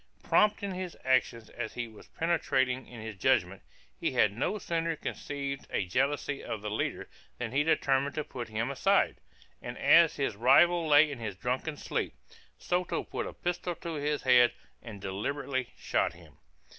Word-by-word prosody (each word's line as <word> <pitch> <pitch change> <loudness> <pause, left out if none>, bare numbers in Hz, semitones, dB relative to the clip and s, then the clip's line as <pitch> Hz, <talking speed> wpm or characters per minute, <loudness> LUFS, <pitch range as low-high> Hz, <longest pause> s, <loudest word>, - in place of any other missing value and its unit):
Prompt 210 -1 +3
in 200 - -2
his 185 -1 -5
actions 120 -3 +1
as 110 - -5
he 120 -1 -3
was 110 -2 -15
penetrating 130 -6 0
in 120 -2 -10
his 110 -1 -6
judgment, 95 -3 +1 0.4
he - - -1
had 105 - +3
no 185 - -1
sooner 165 -3 -1
conceived 140 -2 -5
a 95 - -1
jealousy 140 +7 -1
of 105 -2 -5
the 105 - -3
leader 105 - -2 0.3
than 120 -2 -4
he 140 +3 +2
determined 140 -3 +1
to 155 - -1
put 125 -5 -7
him 110 +4 -2
aside; 195 +8 +2 0.4
and - - -6
as 170 -1 +6
his 135 -7 -1
rival 160 +9 +5
lay 150 0 +6
in 135 - -6
his 105 -4 -4
drunken 125 +8 -2
sleep, - - -3 0.4
Soto 180 0 -1
put - - -4
a - - -7
pistol 175 0 -3
to 170 +1 -6
his 150 -1 -1
head, 125 -2 +6 0.3
and 110 -4 -9
deliberately 130 +7 -3
shot - - 0
him. - - -17
135 Hz, 170 wpm, -30 LUFS, 115-160 Hz, 0.4 s, as